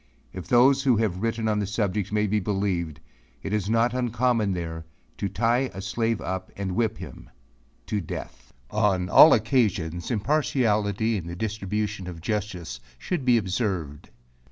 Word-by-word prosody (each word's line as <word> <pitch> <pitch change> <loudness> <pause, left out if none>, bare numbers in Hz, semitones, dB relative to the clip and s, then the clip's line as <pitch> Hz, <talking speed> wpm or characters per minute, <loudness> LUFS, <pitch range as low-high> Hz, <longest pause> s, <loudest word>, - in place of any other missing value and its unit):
If 95 -2 -7
those 130 +3 +5
who 130 -5 +3
have 100 -4 -1
written 115 0 -1
on 105 -1 +1
the 100 - -1
subject, 100 -1 -1
may 105 0 +1
be 105 +1 +1
believed, 90 -6 -2 0.4
it 100 - -3
is 105 -2 -1
not 115 +1 +2
uncommon 120 -4 +1
there, 80 -2 -5 0.4
to 100 - -1
tie 120 +6 +1
a - - -6
slave 115 +2 -1
up 95 0 -4
and 100 -2 -3
whip 110 0 0
him - - -10 0.6
to 105 - -2
death. 60 -6 -8 0.2
On 100 -4 +1
all 160 - +9
occasions 105 - +1
impartiality 110 -4 +1
in 85 -4 -6
the 85 - -5
distribution 105 -1 -3
of 85 -2 -7
justice 90 - -4 0.2
should 175 - -3
be 125 -2 +5
observed. 95 - -2
105 Hz, 155 wpm, -25 LUFS, 95-115 Hz, 0.6 s, all